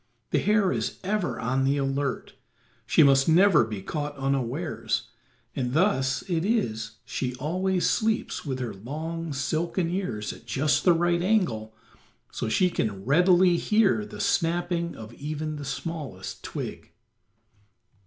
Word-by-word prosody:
The - - +3
hare 210 -2 +3
is - - -2
ever 200 0 -1
on 130 +3 0
the 140 +2 +2
alert; 135 -1 -2 0.5
she - - +5
must 135 +1 +5
never 175 -3 +6
be 105 -4 -5
caught 145 +2 -4
unawares, 135 +3 -1 0.5
and 125 -1 -2
thus 135 -6 +2
it 170 -3 0
is 115 - -1
she 125 -1 -3
always 180 +7 0
sleeps 220 0 0
with 135 -4 -3
her 120 -4 -4
long, 160 +10 -5
silken 165 +5 -1
ears 125 - -3
at - - -15
just 145 +2 +1
the 180 - +7
right 170 +1 +2
angle, 125 - 0 0.6
so 115 - -3
she 180 - +3
can 100 - -2
readily 175 +5 +5
hear 210 +1 +2
the 210 - -9
snapping 170 0 0
of 110 +1 -10
even 155 +3 -4
the 145 - -6
smallest 135 - -5
twig. - - -6
155 Hz, 140 wpm, -26 LUFS, 130-180 Hz, 0.6 s, the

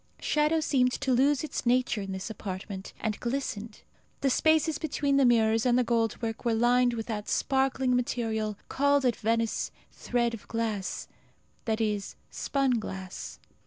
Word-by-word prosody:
Shadow 305 +2 +2
seemed 255 -4 +2
to 270 -2 0
lose 275 +3 +3
its 310 - -4
nature 245 -3 +2
in 195 -1 -5
this 190 +4 -4
apartment, 190 -1 -6
and 215 -2 -2
glistened. 235 -4 -4 0.4
The 270 - +2
spaces 315 +1 +3
between 285 -3 0
the 275 - +5
mirrors 225 -2 +4
and 245 -1 +3
the 250 - +4
gold 230 -2 0
work 225 -1 -3
were 235 -2 +1
lined 245 +1 +3
with 225 -1 -4
that 210 -3 -4
sparkling 265 -1 +1
material 220 -4 -1
called 285 0 +2
at 245 - +3
Venice 230 0 0 0.2
thread 240 -1 -1
of 225 - -8
glass 220 -4 -2 0.6
that 220 -1 0
is, 210 -3 -1 0.2
spun 270 -4 0
glass. 190 -3 -7
235 Hz, 160 wpm, -28 LUFS, 220-265 Hz, 0.6 s, the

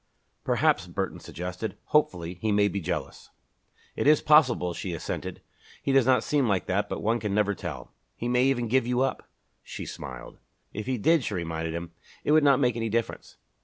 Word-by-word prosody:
"Perhaps," - - +2
Burton - - -3
suggested, 90 +5 -6
hopefully, 90 - +1
"he 110 - +1
may 100 0 +4
be 100 -1 -3
jealous." - - -4 0.7
"It - - 0
is 150 0 +6
possible," 130 - +4
she 90 +1 -4
assented. - - -5 0.4
"He - - 0
does 135 -2 +4
not 125 -3 +4
seem 145 -4 +1
like 100 -3 +1
that 100 +2 0
but - - -4
one 115 +3 +1
can 105 -2 -2
never 105 -1 +2
tell." - - -7 0.2
"He 120 - -4
may 125 +1 +3
even 125 -3 +1
give 120 +1 +2
you 125 +1 +1
up!" 135 - -2 0.3
She - - -7
smiled. - - -8 0.3
"If 105 +3 -5
he 130 -1 0
did," 160 +7 +3
she 105 - -3
reminded 80 -1 -3
him, 85 0 -5 0.3
"it - - +1
would 155 0 +5
not 140 -3 +5
make 125 -4 +2
any 115 -1 -2
difference." 115 +1 -3
115 Hz, 195 wpm, -27 LUFS, 95-130 Hz, 0.7 s, is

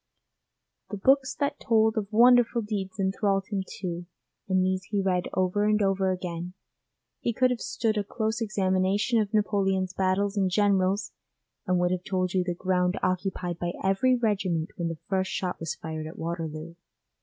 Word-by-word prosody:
The 205 - -4
books 265 +5 +3
that 285 0 -1
told 220 -1 +3
of 210 -2 -3
wonderful 240 +1 +5
deeds 200 -2 -4
enthralled 195 0 +1
him 200 -2 0
too, 175 -2 -5 0.4
and 185 -1 +3
these 185 0 -1
he 205 +1 -1
read 185 -2 +1
over 185 +2 +1
and 210 0 +3
over 195 -1 +1
again. 180 -1 -4 0.7
He 235 - -1
could 255 +3 +3
have 245 - -2
stood 220 -2 -1
a - - -1
close 220 +3 -2
examination 200 +2 +1
of 205 -1 -3
Napoleon's 195 -3 +1
battles 195 +2 +1
and 190 -2 +2
generals, 200 0 +2 0.6
and 180 0 +2
would 175 0 +2
have 185 -1 -2
told 185 -1 -1
you 185 -1 +2
the 175 -1 -3
ground 180 0 0
occupied 180 -2 -1
by 175 0 -2
every 195 +7 +3
regiment 190 -8 0
when 170 - -2
the 165 -1 -4
first 190 -1 0
shot 180 -1 -2
was 165 - -3
fired 160 -1 -6
at 160 - -10
Waterloo. 165 -1 -5
190 Hz, 170 wpm, -27 LUFS, 180-210 Hz, 0.7 s, wonderful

